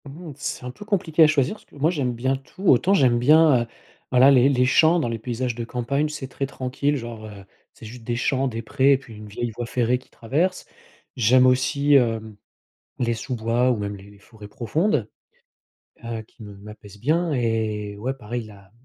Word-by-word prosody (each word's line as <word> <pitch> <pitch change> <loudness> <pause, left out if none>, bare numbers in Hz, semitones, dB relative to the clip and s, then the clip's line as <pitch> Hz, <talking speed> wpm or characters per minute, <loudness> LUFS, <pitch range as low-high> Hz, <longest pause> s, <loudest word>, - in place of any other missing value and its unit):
Mmh. 155 +4 -9
C'est - - -5
un 125 - -5
peu 130 - -12
compliqué 175 -6 +2
à - - +7
choisir 150 +3 +1
parce 220 - -19
que - - -22
moi 150 +4 +1
j'aime 135 -7 -1
bien 130 +3 -1
tout. 135 +8 -12
Autant 175 +9 +4
j'aime 125 -8 +3
bien, 150 0 +5
heu, - - -2 0.4
voilà 130 +2 +6
les 130 0 +5
les 125 -2 +2
champs 160 +6 +4
dans 150 - -1
les 115 -1 -4
paysages 125 +2 -3
de 120 - -4
campagne, 135 +5 -2
c'est 145 -3 -6
très 135 +1 -4
tranquille 140 +2 -2
genre, 115 -3 -8
heu, 100 -2 -12 0.3
c'est - - -14
juste 115 +2 -10
des 120 +1 -2
champs, 135 +2 0
des 115 -2 -5
prés 135 +4 +3
et - - +3
puis 120 -5 -14
une 105 0 -10
vieille 115 +3 -4
voie 120 -1 -5
ferrée 125 +1 0
qui - - -24
traverse. 160 +11 -2 0.5
J'aime 125 +2 +4
aussi, 140 +3 +2
hem, 115 -4 +1 0.7
les 120 -1 +1
sous-bois 120 +1 0
ou - - -1
même 100 0 -4
les 100 +1 -15
forêts 105 +1 -14
profondes. 160 - -1 1.0
Heu, 115 -1 -5
qui 110 +1 -16
me 105 -1 -10
m'apaisent 105 0 -13
bien 160 +8 +1
et 110 -4 -1
ouais, 125 +6 -3
pareil 120 -2 -6
la 105 -1 -13
m - - -25
125 Hz, 205 wpm, -23 LUFS, 115-140 Hz, 1.0 s, à